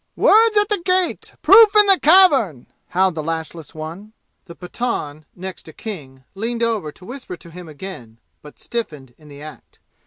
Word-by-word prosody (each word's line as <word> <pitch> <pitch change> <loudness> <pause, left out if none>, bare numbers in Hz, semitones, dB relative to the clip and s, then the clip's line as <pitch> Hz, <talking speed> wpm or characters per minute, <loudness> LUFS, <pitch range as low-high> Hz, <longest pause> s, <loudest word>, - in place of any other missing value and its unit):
"Words 440 0 +4
at 415 0 +3
the 415 -2 0
gate 365 -1 -1
proof 430 +1 +7
in 420 0 +7
the 390 -2 +4
cavern!" 285 - +4 0.2
howled 185 0 +1
the 160 - -5
lashless 160 0 -6
one. 170 +8 -9 0.3
The 170 - -12
Pathan 175 -7 -5
next 185 -2 -9
King 140 - -9
leaned 230 +4 -4
over 220 -9 -2
to 180 - -18
whisper 245 -6 -9
to 170 - -16
him 175 -1 -11
again, 145 -9 -10 0.2
but 150 - -15
stiffened 150 - -6
in 150 - -18
the 145 0 -13
act. 150 -5 -13
185 Hz, 165 wpm, -19 LUFS, 155-250 Hz, 0.3 s, proof